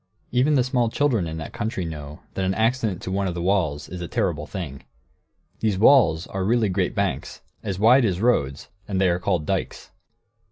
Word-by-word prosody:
Even 135 +5 +3
the 130 - +4
small 125 -2 +1
children 115 -9 +1
in 80 0 -5
that 80 - -7
country 105 -4 -3
know 75 -2 -7
that 95 - -2
an 95 0 0
accident 110 -4 0
to 95 - -4
one 100 0 0
of 90 - -3
the - - -3
walls 85 -7 0
is 90 0 -7
a 85 - -4
terrible 75 -5 -1
thing. 80 -9 -6 0.8
These 105 -4 0
walls 105 - +5
are 95 -1 -4
really 110 +1 +2
great 95 +2 -1
banks, 100 -3 -2 0.2
as 95 -2 -3
wide 120 +6 +5
as 95 -5 0
roads, 75 - 0 0.2
and 95 -2 -1
they 95 -1 +4
are 85 0 +1
called 90 -4 0
"dikes." - - -3
95 Hz, 200 wpm, -24 LUFS, 85-115 Hz, 0.8 s, walls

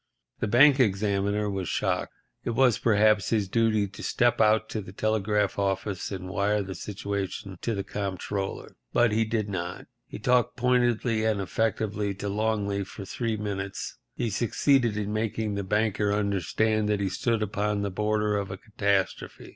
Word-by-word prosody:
The - - 0
bank 135 +6 +6
examiner 100 -1 +1
was 95 -3 -3
shocked. - - -1 0.3
It 115 - -2
was, 125 -2 +4
perhaps, 110 -3 +3
his 105 -4 +1
duty 110 0 +2
to 100 - -11
step 120 -1 +2
out 110 0 +4
to 110 - -3
the 95 - -10
telegraph 105 -1 0
office 100 0 -1
and 95 -2 -5
wire 100 +2 +1
the 95 0 -6
situation 100 0 -5
to 115 - -1
the 100 - -2
Comptroller. 100 0 -4 0.2
But 120 -2 +4
he 110 +1 +2
did 110 -1 -1
not. 90 -3 -4 0.2
He - - -7
talked 125 +3 +2
pointedly 120 -2 +2
and 110 -2 +1
effectively 105 0 -1
to 100 +1 -4
Longley 100 -1 0
for 95 +1 -9
three 115 +1 -2
minutes. 100 -2 -4 0.2
He 115 -2 -1
succeeded 120 +1 +2
in 105 0 -2
making 110 -1 -1
the 100 0 -2
banker 105 +1 +1
understand 105 +2 +1
that 105 -1 +1
he 100 - 0
stood 110 +4 0
upon 105 0 -1
the 100 - -2
border 105 +1 0
of 100 -1 -3
a 95 - -5
catastrophe. 100 -2 -2
105 Hz, 165 wpm, -27 LUFS, 100-110 Hz, 0.3 s, bank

